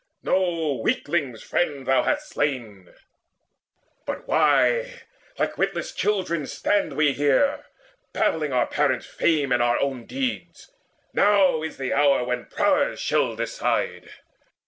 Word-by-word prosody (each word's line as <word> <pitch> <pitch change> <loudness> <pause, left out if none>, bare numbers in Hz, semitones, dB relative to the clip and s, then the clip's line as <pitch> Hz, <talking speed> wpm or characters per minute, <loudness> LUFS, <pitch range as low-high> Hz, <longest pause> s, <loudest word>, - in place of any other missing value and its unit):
No 165 -7 0
weakling's 155 - -1
friend 145 -6 -1
thou 135 - +3
hast 300 0 -1
slain! 115 - -3 1.2
But - - -5
why - - +2 0.3
like - - -2
witless - - -1
children 180 -7 -1
stand 205 -1 0
we 150 -2 +2
here 145 - +1 0.4
Babbling 150 -3 0
our 125 -1 +2
parents' 140 -4 0
fame 150 -5 0
and 120 - +3
our 120 0 +2
own 135 -4 -3
deeds? 265 - -4 0.4
Now 195 -6 +4
is 160 - -6
the 135 -1 -2
hour 140 -3 +3
when 125 0 -3
prowess - - +1
shall - - 0
decide." - - -2
150 Hz, 125 wpm, -24 LUFS, 130-190 Hz, 1.2 s, Now